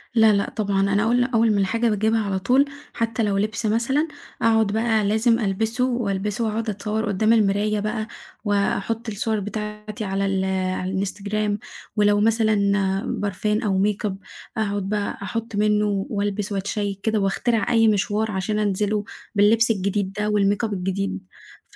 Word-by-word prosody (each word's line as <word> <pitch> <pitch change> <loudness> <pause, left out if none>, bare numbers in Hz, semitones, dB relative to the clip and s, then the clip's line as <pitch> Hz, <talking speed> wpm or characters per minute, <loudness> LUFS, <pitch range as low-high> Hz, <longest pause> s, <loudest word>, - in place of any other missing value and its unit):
لأ، 220 -2 +6
لأ، 200 0 0
طبعًا 200 -3 -1
أنا 205 +1 +3
أول 240 +2 +3
أول 230 -3 +2
ما 205 - +2
الحاجة 230 +4 +1
باجيبها 220 +1 +1
على 195 -1 -1
طول، 255 +8 +3 0.3
حتى 230 0 -1
لو 200 -2 +1
لبس 215 +3 -1
مثلًا، 240 +8 +1 0.3
أقعد 225 -1 +4
بقى 220 +1 +1
لازم 220 +3 +2
ألبسه، 225 +4 0
وألبسه 210 -3 -1
وأقعد 220 +1 -2
أتصور 215 +2 -2
قدام 215 +2 +2
المراية 210 -1 +2
بقى، 215 +1 -2 0.4
وأحط 205 +3 0
الصور 220 +1 -1
بتاعتي 210 +1 -5
على 195 0 -1
ال 195 -1 0 0.3
على 185 +1 -3
الإنستجرام. 205 +2 -2 0.4
ولو 205 -1 +3
مثلًا 220 0 +3 0.6
برفان 210 +2 -1
أو 195 -4 +1
makeup 210 -1 0 0.4
أقعد 205 -2 -1
بقى 210 -1 -2
أحط 225 +2 -4
منه 210 -1 +1
وألبس 205 0 -2
وأتشيك 200 0 -2
كده، 220 0 +1
وأخترع 210 +3 0
أي 225 -1 +5
مشوار 215 +1 +1
عشان 210 +2 -1
أنزله 210 0 0 0.3
باللبس 225 +3 +4
الجديد 200 -1 -1
ده 210 +1 -1
والmakeup 205 +1 +1
الجديد. 195 +1 -2 0.5
ف - - -21
210 Hz, 150 wpm, -23 LUFS, 200-225 Hz, 0.6 s, لأ